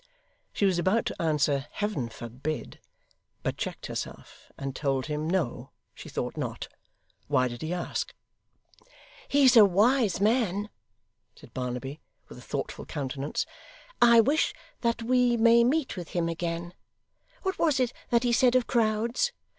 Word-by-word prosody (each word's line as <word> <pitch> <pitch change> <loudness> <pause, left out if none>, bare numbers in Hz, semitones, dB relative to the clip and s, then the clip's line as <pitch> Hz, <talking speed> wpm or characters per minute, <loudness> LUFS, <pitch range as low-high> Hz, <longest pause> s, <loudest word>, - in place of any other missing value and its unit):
She 205 - 0
was 185 -3 +2
about 190 +6 +2
to - - -4
answer 150 -3 +1
'Heaven 205 - -2
forbid!' 125 +7 -6 0.6
but - - -1
checked - - -5
herself, - - -7
and 135 -1 -5
told 135 -3 0
him 150 +1 -2
No, 140 -8 -1 0.2
she - - -10
thought - - -3
not; - - -4 0.6
why 130 0 +2
did 120 -1 -7
he 160 +1 -3
ask? 180 -1 -3 1.2
'He's 275 -3 +5
a 225 - +10
wise 210 +2 +3
man,' 210 -2 +1 0.6
said - - -16
Barnaby, 130 +3 -4 0.3
with - - -11
a - - -12
thoughtful - - -5
countenance. 140 +1 -3 0.6
'I 235 -1 +8
wish 290 +8 +1 0.2
that 235 -1 0
we 245 0 +3
may 235 +1 +6
meet 275 +4 +1
with 175 -4 -7
him 170 -1 +1
again. 170 +1 -3 0.7
What 380 0 -2
was 305 -5 +3
it 245 -2 +1 0.2
that 235 0 +3
he 240 -1 +2
said 245 +1 +4
of 255 -2 +4
crowds? 235 - +1
195 Hz, 145 wpm, -28 LUFS, 150-235 Hz, 1.2 s, a